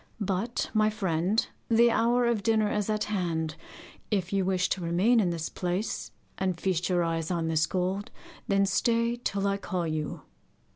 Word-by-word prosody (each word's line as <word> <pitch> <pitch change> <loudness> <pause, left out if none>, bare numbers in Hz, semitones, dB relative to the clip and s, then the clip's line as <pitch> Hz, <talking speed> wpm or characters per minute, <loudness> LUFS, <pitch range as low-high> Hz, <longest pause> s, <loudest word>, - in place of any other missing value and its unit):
But, 200 +3 -2
my 215 -1 +4
friend, 190 0 0 0.2
the 235 +1 +5
hour 240 +2 +3
of 235 -3 +1
dinner 215 0 +2
is 210 0 -1
at 215 -1 +1
hand. 170 -6 -1 0.6
If 190 -3 -1
you 195 -1 +2
wish 185 0 +1
to 190 - -1
remain 180 +8 +3
in 190 -5 +2
this 165 -1 -2
place, 180 +4 -3 0.3
and 185 -3 -1
feast 180 -1 0
your 175 -1 +2
eyes 165 -1 -1
on 170 -3 -1
this 155 -1 +2
gold, 190 +2 -1 0.4
then 195 0 +3
stay 230 +4 +1
till 200 -5 -2
I 200 0 +1
call 185 -3 -3
you. 155 -2 -3
195 Hz, 175 wpm, -28 LUFS, 175-215 Hz, 0.6 s, the